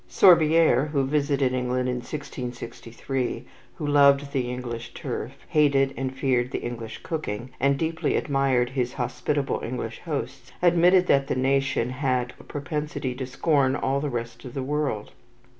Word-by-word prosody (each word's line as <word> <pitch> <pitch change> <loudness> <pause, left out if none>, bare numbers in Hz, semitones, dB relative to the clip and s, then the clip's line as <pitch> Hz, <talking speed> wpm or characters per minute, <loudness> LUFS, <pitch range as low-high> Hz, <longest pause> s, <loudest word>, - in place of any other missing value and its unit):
Sorbieres, 160 -4 +5
who 140 -2 +2
visited 140 -2 +1
England 125 0 0
in 125 0 -1
1663, 125 -1 -5 0.3
who 155 - -5
loved 140 -1 +4
the 130 -3 -1
English 120 -2 -6
turf, - - -4 0.2
hated 140 -3 +3
and 130 0 -4
feared 125 -2 +1
the - - -3
English 115 -2 -6
cooking, 125 -7 -4
and 140 +1 +3
deeply 160 +2 -1
admired 135 -3 +1
his 125 -2 -1
hospitable 140 +2 -1
English 125 +1 -4
hosts, - - -4
admitted 180 +1 +5
that 140 -4 +3
the - - -1
nation 135 -2 +1
had 130 -2 -1
"a - - -13
propensity 145 -2 -4
to 130 0 -5
scorn 135 0 +2
all 135 +1 0
the 145 +1 -2
rest 120 -2 -5
of 125 - -9
the 135 - -2
world." 145 -6 -2
135 Hz, 150 wpm, -25 LUFS, 125-145 Hz, 0.3 s, Sorbieres